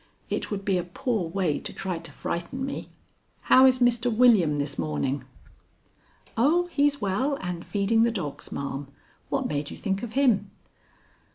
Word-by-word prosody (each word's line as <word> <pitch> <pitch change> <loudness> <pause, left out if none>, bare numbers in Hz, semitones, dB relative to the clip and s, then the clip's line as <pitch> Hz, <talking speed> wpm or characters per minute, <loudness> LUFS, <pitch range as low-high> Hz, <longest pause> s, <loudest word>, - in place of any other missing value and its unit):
It - - -2
would 195 -2 -4
be 190 -3 +2
a - - -2
poor 180 +1 -2
way 175 -4 0
to - - -5
try 185 -3 -3
to - - -10
frighten 175 +11 -4
me. 275 - -5 0.5
How 260 +1 +7
is 255 -1 +4
Mr. 245 -1 +2
William 215 -10 +5
this 145 -5 -2
morning?" 85 - -1 1.1
"Oh, 310 +10 +3
he's 285 -1 +2
well 230 +9 0
and 180 -7 -5
feeding 210 +2 +1
the 235 - +4
dogs, 185 -11 -5
ma'am. 140 0 -4 0.4
What 270 -2 0
made 145 0 -2
you - - -8
think 195 -1 -2
of 235 -2 -6
him?" 235 -8 +3
200 Hz, 165 wpm, -26 LUFS, 170-250 Hz, 1.1 s, How